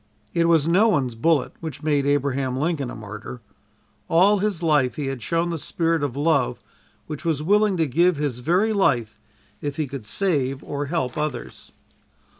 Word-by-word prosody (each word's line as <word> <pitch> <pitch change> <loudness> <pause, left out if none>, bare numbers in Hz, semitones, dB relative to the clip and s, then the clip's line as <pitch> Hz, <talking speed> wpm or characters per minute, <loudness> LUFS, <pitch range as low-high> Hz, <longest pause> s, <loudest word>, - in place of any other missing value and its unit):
It 170 0 +2
was 160 -2 +4
no 190 +7 +4
one's 135 - +1
bullet 145 +6 +1
which 160 -2 -7
made 145 -2 +1
Abraham 135 -2 0
Lincoln 145 -3 -1
a - - -7
martyr. 110 +3 -8 0.7
All 195 +5 +4
his 195 -4 -1
life 145 -7 +2
he 150 - -3
had 135 -2 -4
shown 170 +7 0
the 165 - -3
spirit 165 +1 0
of 140 -2 -2
love 145 -3 +1 0.5
which 150 -2 -7
was 160 -3 0
willing 205 +2 +3
to 165 - +2
give 170 +5 +2
his 140 -5 -2
very 180 - +2
life 120 - +1 0.4
if 145 -1 -4
it 150 -5 -2
could 130 -6 -7
save 140 - 0
or 145 0 -4
help 150 -4 -2
others. 150 -5 -5
150 Hz, 175 wpm, -23 LUFS, 135-170 Hz, 0.7 s, was